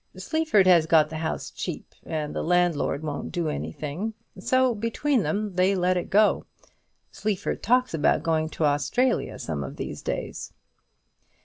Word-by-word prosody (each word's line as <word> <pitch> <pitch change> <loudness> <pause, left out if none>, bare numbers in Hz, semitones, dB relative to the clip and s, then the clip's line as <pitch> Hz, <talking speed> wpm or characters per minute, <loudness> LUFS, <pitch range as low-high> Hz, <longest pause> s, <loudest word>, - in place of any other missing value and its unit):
Sleaford 315 - +2
has 170 -4 +5
got 155 -2 +4
the 160 - -4
house 160 0 -3
cheap, - - -6
and 155 -2 -3
the - - -1
landlord 175 -4 +1
won't 145 -2 -4
do 170 -2 -1
anything; 160 +8 -4 0.2
so 255 +5 +2
between 230 +4 0
them 205 0 -2
they 185 +2 +3
let 180 0 +2
it 180 - -2
go. 210 +1 +3 0.6
Sleaford 210 -3 -2
talks 250 +1 +2
about 160 -1 +2
going 160 -1 +1
to 160 - -1
Australia 145 - +1
some 75 -4 -4
of 65 - -7
these - - -6
days." - - -5
180 Hz, 150 wpm, -25 LUFS, 155-215 Hz, 0.6 s, has